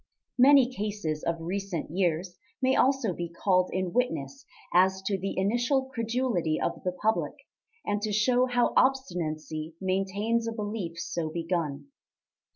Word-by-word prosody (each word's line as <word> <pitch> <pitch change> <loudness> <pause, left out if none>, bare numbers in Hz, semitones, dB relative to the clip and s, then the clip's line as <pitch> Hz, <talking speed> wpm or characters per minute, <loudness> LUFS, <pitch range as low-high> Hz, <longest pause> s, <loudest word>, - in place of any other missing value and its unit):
Many 270 0 +7
cases 205 -9 -3
of 170 0 -1
recent 185 -2 -3
years 175 0 -1 0.2
may 260 0 +2
also 265 -7 +2
be 170 0 -4
called 185 +1 +2
in 185 -1 -2
witness 255 +2 -1 0.3
as 190 +2 +4
to 200 +1 0
the 195 +1 -4
initial 245 +7 +1
credulity 230 -9 0
of - - -2
the 180 - 0
public, 215 +5 0 0.5
and 205 0 -1
to 215 0 -1
show 245 +5 +3
how 245 -1 +2
obstinacy 160 - 0
maintains 195 +5 0
a 230 - -2
belief 205 -6 -4
so 165 -1 -3
begun. 165 - -3
195 Hz, 140 wpm, -28 LUFS, 170-240 Hz, 0.5 s, Many